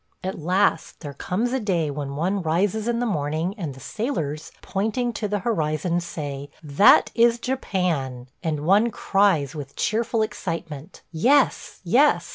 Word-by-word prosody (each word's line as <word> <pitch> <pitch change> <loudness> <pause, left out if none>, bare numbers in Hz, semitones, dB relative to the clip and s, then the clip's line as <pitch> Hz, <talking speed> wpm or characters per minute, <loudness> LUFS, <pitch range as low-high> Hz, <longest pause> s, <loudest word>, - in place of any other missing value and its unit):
At 190 -1 -4
last 185 +5 +1
there 145 -4 -6
comes 215 - -2
a 265 - +1
day 175 - 0
when 140 -1 -5
one 185 +6 0
rises 190 +7 0
in 240 -1 +1
the 245 - 0
morning 160 -2 -1
and 160 - -5
the - - -12
sailors, 160 - -4
pointing 225 +5 -1
to 215 - -3
the 205 0 -1
horizon, 170 -4 0
say, 145 -5 -6
"That 150 +6 +5
is 235 0 +4
Japan," 180 - -2
and 155 -4 -2
one 205 +6 +4
cries 195 - +1
with 145 -3 -8
cheerful 225 +1 0
excitement, 165 -7 -6
"Yes! 250 - +2
yes!" - - +3
180 Hz, 150 wpm, -24 LUFS, 150-215 Hz, -, That